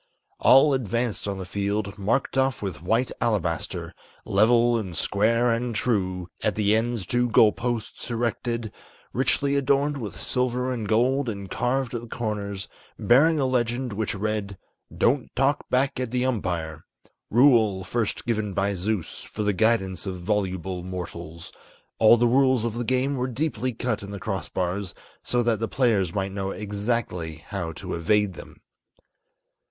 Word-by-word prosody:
All 135 +3 +6
advanced 120 -3 -1
on 100 -1 -2
the 95 - -5
field, 100 +1 -2
marked 115 +9 0
off 135 -1 +2
with 95 -5 -4
white 115 +8 +1
alabaster, 100 -8 -1 0.3
Level 120 +4 +4
and 95 -7 -3
square 115 +7 +2
and 115 0 -1
true, 95 -6 0
at 110 - 0
the 105 0 +3
ends 115 -2 -1
two 120 +5 +1
goal 110 -1 +6
posts 120 -1 -4
erected, 115 -1 -2 0.4
Richly 140 +2 +1
adorned 140 +1 +2
with 100 -6 -6
silver 125 +3 0
and 115 -4 -4
gold 125 +4 +2
and 100 -3 -6
carved 125 0 -1
at 120 - -3
the 120 - -10
corners, 105 -4 -4 0.3
Bearing 150 +6 +4
a 135 - +2
legend 125 -1 0
which 105 0 -2
read, 100 -1 -3 0.3
"Don't 130 +2 +1
talk 135 +3 +1
back 130 +1 +1
at 130 -2 -2
the 125 +1 0
umpire" 90 -10 -2 0.5
Rule 115 -6 +4
first 115 +1 -2
given 110 -4 -1
by 100 +2 +1
Zeus, 100 0 -2
for 105 - -5
the 105 0 +1
guidance 95 -3 +1
of 95 -1 -4
voluble 95 -2 -1
mortals. 85 -2 -7 0.5
All 115 +1 +7
the 120 - +3
rules 130 -1 +3
of 115 - -1
the 120 +1 -3
game 130 +3 0
were 125 +1 -1
deeply 130 -2 -2
cut 120 0 -2
in 100 - -8
the 100 -1 -6
crossbars, 95 -2 -3 0.3
So 120 0 0
that 115 -3 +1
the 115 - -1
players 110 -9 +1
might 95 0 -2
know 95 0 -3
exactly 100 -6 -3
how 85 -5 -3
to - - -6
evade 100 +4 +1
them. - - -12
110 Hz, 160 wpm, -25 LUFS, 100-125 Hz, 0.5 s, All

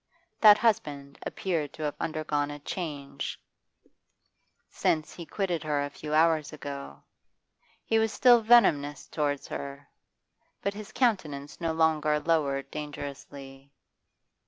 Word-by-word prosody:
That 210 -2 +9
husband 145 -12 -1
appeared 160 -6 -2
to 155 - -7
have 145 -1 -1
undergone 155 -2 -1
a 145 - -6
change 145 -3 -5 1.3
since 155 +2 -1
lie 170 - -6
quitted 180 -2 -2
her 150 -2 0
a 145 - -7
few 150 - -8
hours 160 -1 +3
ago. 140 - -8 0.8
He 225 - +2
was 220 -1 +1
still 240 -1 +6
venomous 165 -11 +4
towards 145 -2 -2
her, 140 0 -6 0.8
but 200 - 0
his 210 0 -9
countenance 155 - -1
no 165 -1 0
longer 155 -2 +2
lowered 145 -4 0
dangerously. 140 -2 -8
150 Hz, 120 wpm, -28 LUFS, 145-170 Hz, 1.3 s, That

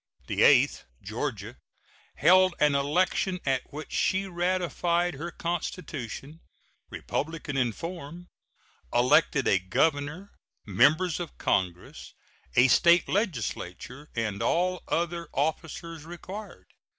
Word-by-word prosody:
The - - -2
eighth - - +5 0.2
(Georgia) - - -4 0.6
held 185 +3 +5
an 150 -1 +4
election 180 +6 +1
at 135 -2 -1
which 150 +2 -8
she 190 +1 +1
ratified 175 -1 0
her 160 +5 -5
constitution, 160 - -5 0.5
republican 160 -1 -4
in 125 -3 +1
form, 170 - -8 0.7
elected 135 +3 +3
a 95 - +4
governor, 145 - -1 0.3
Members 155 - +3
of 170 -3 -7
Congress, 90 -2 -2 0.4
a 120 +2 +6
State 170 +6 +5
legislature, 140 - -3
and 110 -4 -2
all 180 +1 +1
other 170 0 -2
officers 160 +2 -3
required. 185 +5 -9
160 Hz, 100 wpm, -27 LUFS, 135-175 Hz, 0.7 s, a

